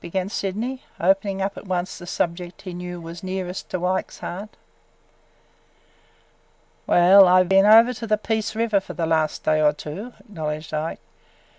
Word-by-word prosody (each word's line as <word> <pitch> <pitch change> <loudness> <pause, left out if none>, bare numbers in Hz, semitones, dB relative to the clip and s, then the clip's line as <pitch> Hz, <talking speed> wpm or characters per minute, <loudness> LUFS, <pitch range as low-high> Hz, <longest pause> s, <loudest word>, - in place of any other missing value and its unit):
began 185 +2 -3
Sydney, 220 +7 -3 0.2
opening 195 +2 +1
up 195 +1 -3
at - - -10
once 185 0 -3
the 175 - -10
subject 175 +1 -3
he 185 - -7
knew 180 0 -6
was 165 +1 -9
nearest 185 -1 -5
Ike's 185 +1 -2
heart. 200 +5 -6 2.4
"Well, 185 +2 +7
I 185 +1 +6
been 195 +2 +4
over 225 +3 +7
to 230 -1 -7
the 215 0 +2
Peace 220 0 -2
River 220 -2 +1
for 195 - -10
the 170 - -1
last 160 -1 0
day 155 0 +2
or 150 -1 +4
two," 190 +12 -8
acknowledged 155 -6 -6
Ike. 155 +1 -3
185 Hz, 155 wpm, -23 LUFS, 175-200 Hz, 2.4 s, Well